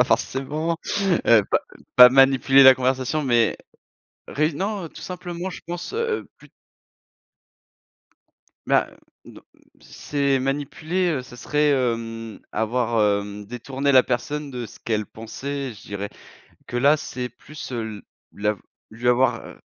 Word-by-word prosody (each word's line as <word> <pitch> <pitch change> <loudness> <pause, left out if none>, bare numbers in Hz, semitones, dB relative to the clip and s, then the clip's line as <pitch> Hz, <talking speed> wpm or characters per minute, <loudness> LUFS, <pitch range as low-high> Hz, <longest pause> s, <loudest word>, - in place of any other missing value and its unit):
pas - - +6
forcément, 155 +5 -1 0.5
heu, 115 -3 +6
pas - - +3 0.4
pas 125 0 +11
manipuler 135 +1 +5
la 130 0 +10
conversation, 130 +3 0
mais 120 -4 +2 0.7
réu 155 +2 0
non, 195 +3 -3
heu, - - -7
tout - - -12
simplement, 180 0 -5
je - - -9
pense, 175 - -5
heu, 465 +1 -1
heu, - - -16
plus - - -17 2.2
Bah - - +3
heu, - - -20 0.3
non, - - -13 0.4
c'est 140 -2 -1
manipuler, 155 +6 -1
heu, 135 -4 -1
ce 125 -1 -13
serait, 150 +3 +1
hem, 115 -3 -2
avoir, 110 -3 +1
hem, 105 0 -8
détourné 130 +5 -2
la 130 -2 +7
personne 145 +3 -3
de 125 -2 -5
ce - - -14
qu'elle 110 -2 -2
pensait, 135 +5 -6
je 105 - -15
dirais 100 0 -6 0.6
que 120 - -3
là, 140 +4 +5
c'est 125 -4 -5
plus, 150 +3 -10
heu, 120 -2 -2
l 105 -1 -8 0.3
l'av 105 0 -1 0.3
lui 115 +3 -4
avoir, 125 +2 +3
heu - - -12
130 Hz, 150 wpm, -23 LUFS, 115-150 Hz, 2.2 s, pas